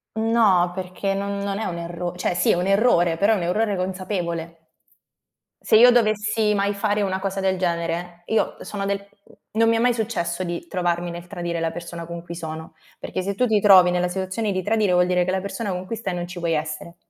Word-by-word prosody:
No, 220 -6 +3
perché 185 +1 -3
non 200 +1 -3
non 200 0 -2
è 220 - -3
un 175 -3 -3
erro 170 +1 -5
cioè 180 - -1
sì - - +2
è - - +3
un 180 +2 -1
errore, 195 -5 +3
però 200 +5 +3
è - - +2
un 175 - -3
errore 205 +4 0
consapevole. 180 -3 -3 1.0
Se - - +3
io 245 +3 +8
dovessi 215 -2 +2
mai 200 0 +1
fare 205 +1 0
una 190 -1 -1
cosa 195 0 -3
del 190 -1 0
genere, 170 0 -2
io 220 - 0
sono 205 -1 -5
del 200 0 0
mhmm, 200 0 -22 0.2
non 225 +1 +3
mi 230 - +3
è - - +1
mai 245 +1 +3
successo 185 -6 -2
di 175 -1 -4
trovarmi 175 -1 -1
nel 175 +1 -8
tradire 175 -1 -4
la 165 - 0
persona 170 0 -7
con 170 0 -7
cui 170 - -8
sono, 160 -1 -7 0.3
perché 185 - -4
se 195 +1 -3
tu 250 - +2
ti 220 -3 +3
trovi 185 -3 +7
nella 180 0 +1
situazione 190 +4 -2
di 185 0 -2
tradire 210 -1 +1
vuol 180 0 +4
dire 180 0 +2
che - - -3
la 190 - 0
persona 200 +2 -4
con 180 0 -4
cui 230 - -4
stai 195 -5 -3
non 175 0 -3
ci 175 0 -8
vuoi 170 -1 0
essere. 155 +2 -4
185 Hz, 230 wpm, -23 LUFS, 175-205 Hz, 1.0 s, io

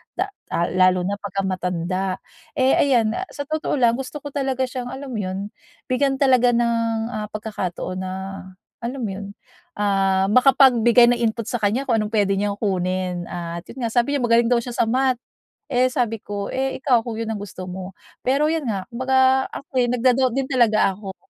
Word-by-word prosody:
da 390 +2 -2 0.2
ah 170 0 0
lalo 185 0 +3
na 200 +2 -2
pagka 195 -1 -3
matanda. 185 0 -2 0.4
Eh, 260 -1 +3
ayan, 235 -6 +3
ah 375 +9 -4
sa 285 - -3
totoo 310 +1 -2
lang, 240 -2 +3
gusto 275 +2 -6
ko 290 - -6
talaga 265 -2 -1
siyang 250 -1 -4
alam 270 0 -7
mo 220 - -3
yun, 195 +2 -4 0.4
bigyan 270 +1 +2
talaga 255 -3 +4
ng 230 -1 0
ah 210 -2 -4
pagkakataon 185 -4 -4
na 185 0 -4 0.7
alam 250 +3 -5
mo 205 - -2
yun, 200 +1 -7 0.4
ah 195 -2 +2
makapagbigay 245 -2 +6
ng 240 - 0
input 230 -1 -1
sa 245 - -1
kanya 215 +6 +1
kung 230 -3 +2
anong 215 +1 -3
pwede 200 -2 +2
niyang 205 0 -1
kunin. 185 -3 -1
At 170 0 -6
yun 260 - -7
nga, 225 - -1
sabi 245 +4 +1
niya 265 - -1
magaling 230 0 +4
daw 245 0 +3
siya 245 - -6
sa 225 - +2
Math. 255 0 +1 0.5
Eh 250 +1 +3
sabi 235 -4 -1
ko, 205 -1 -5
"Eh 265 0 -1
ikaw, 250 -5 +4
kung 225 -1 -5
yun 225 0 -3
ang 215 - -4
gusto 195 -2 -8
mo." 185 +1 -7 0.3
Pero 295 +4 +3
yun 320 -5 -2
nga, 195 -4 -2
kung 235 +2 -6
baga 265 0 +4
ako'y 255 -3 -1
nag-da-doubt 250 +1 +2
din 270 - +1
talaga 225 -6 +3
ako. 190 -1 -8
230 Hz, 195 wpm, -22 LUFS, 195-260 Hz, 0.7 s, makapagbigay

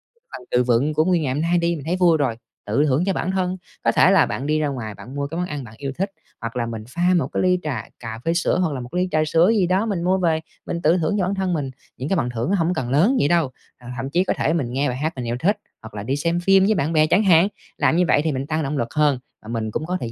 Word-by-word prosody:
cái 470 - -38
phần 125 - -9
từ 125 - +3
vựng 125 +5 +2
của 155 +1 +2
nguyên 180 -2 +2
ngày 130 -2 -1
hôm 145 - -1
nay 170 +2 +2
đi 170 0 +1
mình 145 -2 -8
thấy 175 +3 0
vui 175 -3 +4
rồi, 135 -6 0 0.3
tự 135 +9 +2
thưởng 145 +3 +2
cho 195 - +1
bản 185 - -1
thân. 185 -1 -1 0.3
Có - - +3
thể - - +5
là - - +5
bạn 135 - -4
đi 155 0 +1
ra 150 - +1
ngoài, 115 -7 -5
bạn 130 +4 -11
mua 140 0 -2
cái 165 +4 -6
món 180 - -1
ăn 145 -2 -5
bạn 110 -3 -11
yêu 140 -1 -4
thích, 195 +2 -1 0.3
hoặc 115 +2 -5
là 120 -1 -1
mình 115 -2 -5
pha 175 +6 +1
một 170 - +1
cái - - -2
ly 180 -1 +3
trà 135 -8 -3 0.2
cà 115 -1 -6
phê 165 - +2
sữa, 175 +1 +1
hoặc 165 -5 +1
là 130 - -4
một 120 - -8
cái 180 - 0
ly 185 - +1
trà 155 0 +2
sữa 165 +6 +4
gì 190 -5 +2
đó 190 +5 +2
mình 195 -6 -2
mua 185 +2 +2
về 165 -4 +1 0.3
mình 170 - -3
tự 165 +3 +4
thưởng 165 +4 0
cho 185 - +1
bản 195 +2 -1
thân 190 -2 -1
mình, 140 -5 -2 0.3
những 135 +4 -4
cái - - +2
phần 125 -6 0
thưởng 120 +4 -3
nó 200 - +3
hổng 175 -1 +1
cần 125 -6 -3
lớn 170 - +3
vậy - - +3
đâu. 165 -5 +2 0.3
Ờ, 125 - -13
thậm 135 +2 -3
chí 175 +5 +2
có - - 0
thể 160 - +1
mình 130 -8 -2
nghe 140 +2 +1
bài 125 - -3
hát 155 +4 -2
mình 125 -2 -5
yêu 120 - -1
thích, 200 +9 +2 0.2
hoặc 110 - -11
là 100 -1 -5
đi 130 +5 -1
xem 170 +4 0
phim 195 +2 +4
với 215 +2 +3
bạn 160 -2 0
bè 155 -1 +4
chẳng 195 +7 +3
hạn, 180 0 +5 0.3
làm - - +2
như 180 - +4
vậy 145 - +4
thì 160 - 0
mình 135 0 -3
tăng 160 0 -1
động 145 +1 -2
lực 115 -2 -3
hơn, 150 -4 +2 0.2
và 110 - -15
mình 110 -2 -2
cũng 155 - -3
có 180 +2 -1
thời 115 - -4
155 Hz, 330 wpm, -22 LUFS, 130-180 Hz, 0.3 s, thể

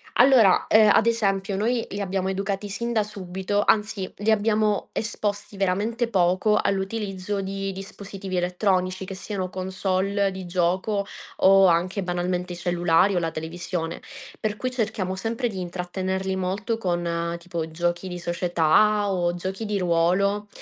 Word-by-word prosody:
Allora, 245 -6 +6
ehm, 215 -1 +6
ad 220 - +4
esempio 200 -4 +1
noi 230 +4 0
li 200 - -3
abbiamo 190 -1 -1
educati 195 +1 -2
sin 235 +4 -3
da 220 -2 +2
subito 195 0 -2
anzi 210 -3 +1
li 210 +2 +1
abbiamo 215 -1 +1
esposti 205 -2 -3
veramente 205 +5 0
poco 185 +1 +2
all'utilizzo 195 0 -2
di 195 0 -3
dispositivi 195 0 -7
elettronici, 185 +1 0
che 190 - -6
siano 190 -2 -4
console 190 +1 -1
di 190 -1 -7
gioco 185 +4 0 0.3
o 195 0 +6
anche 180 +3 +1
banalmente 180 0 -2
cellulari 175 +2 +2
o - - +3
la 165 -1 -2
televisione. 165 +1 -4 0.4
Per 215 -1 -1
cui 255 +2 -2
cerchiamo 215 -6 -2
sempre 230 +5 -2
di 195 - -6
intrattenerli 185 +2 -3
molto 195 +5 -2
con 170 -3 -1
tipo 170 -2 -4
giochi 175 +3 -2
di 180 -1 -5
società, 175 +4 +2
o 175 -1 0
giochi 190 +5 -4
di 210 -1 -1
ruolo. 185 +4 +1
190 Hz, 145 wpm, -24 LUFS, 180-205 Hz, 0.4 s, Allora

